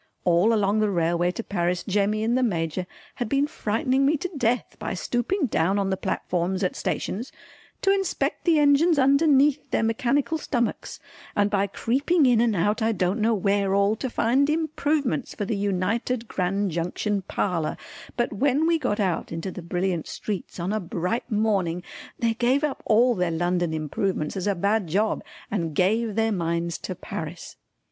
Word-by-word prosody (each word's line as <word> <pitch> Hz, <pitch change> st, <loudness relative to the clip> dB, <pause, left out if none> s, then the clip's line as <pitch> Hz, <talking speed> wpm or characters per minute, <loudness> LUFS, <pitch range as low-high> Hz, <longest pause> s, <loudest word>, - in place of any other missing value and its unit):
All 175 Hz, +5 st, +4 dB
along 210 Hz, -1 st, +2 dB
the 215 Hz, -1 st, +2 dB
railway 175 Hz, -1 st, +1 dB
to 230 Hz, -, -5 dB
Paris 180 Hz, -3 st, -1 dB
Jemmy 205 Hz, +2 st, 0 dB
and 235 Hz, +2 st, +1 dB
the 255 Hz, -, +2 dB
Major 180 Hz, -5 st, -1 dB, 0.3 s
had 240 Hz, -3 st, -2 dB
been 275 Hz, +3 st, +2 dB
frightening 260 Hz, -1 st, 0 dB
me 295 Hz, +3 st, +3 dB
to 365 Hz, +5 st, -4 dB
death 245 Hz, -3 st, 0 dB
by -, -, -3 dB
stooping 245 Hz, -, -1 dB
down 195 Hz, -4 st, +1 dB
on 195 Hz, -1 st, 0 dB
the -, -, +2 dB
platforms 185 Hz, +1 st, -2 dB
at 185 Hz, -, 0 dB
stations 235 Hz, +7 st, -3 dB, 0.5 s
to 390 Hz, -, +4 dB
inspect 390 Hz, -1 st, -1 dB
the 335 Hz, -3 st, +4 dB
engines 295 Hz, +3 st, +4 dB
underneath 280 Hz, +1 st, +4 dB
their -, -, +1 dB
mechanical 265 Hz, +7 st, +1 dB
stomachs, 240 Hz, -6 st, -2 dB, 0.4 s
and 205 Hz, 0 st, +2 dB
by 200 Hz, 0 st, +2 dB
creeping 280 Hz, -, +1 dB
in 240 Hz, -3 st, +4 dB
and 230 Hz, -3 st, +2 dB
out 205 Hz, +6 st, +1 dB
I 225 Hz, +1 st, +2 dB
don't 185 Hz, +2 st, 0 dB
know 225 Hz, +1 st, +3 dB
where 200 Hz, 0 st, +1 dB
all, 200 Hz, +2 st, +3 dB
to 260 Hz, -, -3 dB
find 260 Hz, +5 st, +2 dB
improvements 300 Hz, -4 st, -1 dB
for 205 Hz, -, -3 dB
the 220 Hz, -, -1 dB
United 205 Hz, +5 st, -1 dB
Grand 195 Hz, +1 st, -1 dB
Junction 180 Hz, +5 st, -1 dB
Parlour, 175 Hz, -3 st, -2 dB, 0.4 s
but 240 Hz, -2 st, 0 dB
when 280 Hz, +7 st, +2 dB
we 335 Hz, 0 st, +2 dB
got 210 Hz, -8 st, -1 dB
out 185 Hz, -5 st, -1 dB
into 165 Hz, +3 st, -4 dB
the 180 Hz, -, -7 dB
brilliant 175 Hz, 0 st, -2 dB
streets 200 Hz, -3 st, -5 dB
on 180 Hz, +4 st, -2 dB
a 215 Hz, -, 0 dB
bright 180 Hz, +6 st, -3 dB
morning 195 Hz, -5 st, 0 dB, 0.3 s
they 230 Hz, -1 st, +1 dB
gave 250 Hz, +5 st, +1 dB
up 295 Hz, -3 st, -1 dB
all 240 Hz, +3 st, +5 dB
their 180 Hz, -5 st, 0 dB
London 175 Hz, +1 st, 0 dB
improvements 155 Hz, +2 st, -2 dB
as 190 Hz, 0 st, -2 dB
a 200 Hz, -, +1 dB
bad 200 Hz, +2 st, +1 dB
job 205 Hz, +7 st, 0 dB, 0.3 s
and 165 Hz, -7 st, -2 dB
gave 215 Hz, +5 st, +1 dB
their 225 Hz, 0 st, +2 dB
minds 170 Hz, -2 st, -1 dB
to 185 Hz, -, -5 dB
Paris. 165 Hz, 0 st, -7 dB
210 Hz, 175 wpm, -25 LUFS, 180-250 Hz, 0.5 s, all